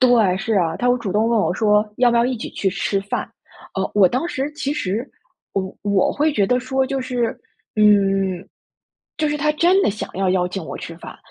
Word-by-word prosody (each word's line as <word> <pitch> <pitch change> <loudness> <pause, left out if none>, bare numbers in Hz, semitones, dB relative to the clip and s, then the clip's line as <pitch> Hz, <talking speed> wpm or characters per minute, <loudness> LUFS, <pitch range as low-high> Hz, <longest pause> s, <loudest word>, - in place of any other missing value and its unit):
对， 230 -8 +4
是 215 +2 -1
啊， 165 -4 +1
她 245 - 0
会 245 0 +3
主 200 -5 -4
动 220 +2 +2
问 235 - +2
我 - - 0
说 210 -1 +2
要 245 -1 +5
不 235 - +2
要 235 - +4
一 255 -1 -1
起 - - -6
去 195 - -1
吃 195 +1 -1
饭， 200 +1 -4 0.5
呃， 190 0 -2
我 200 -3 +6
当 255 - -1
时 275 0 -3
其 290 -1 -3
实 225 -1 -2 0.4
我 190 -1 -3
我 200 -2 +2
会 300 +1 +1
觉 205 -8 +2
得 250 +4 +2
说 265 +1 0
就 270 0 -2
是 250 -3 -2 0.4
嗯， 195 -3 +3 0.7
就 305 -1 +1
是 295 - -1
她 300 +1 +1
真 355 +5 +3
的 - - +2
想 210 - -5
要 190 -1 0
邀 180 -1 +1
请 190 -1 -5
我 - - -6
吃 165 - -8
饭， - - -10
215 Hz, 240 characters per minute, -21 LUFS, 195-255 Hz, 0.7 s, 我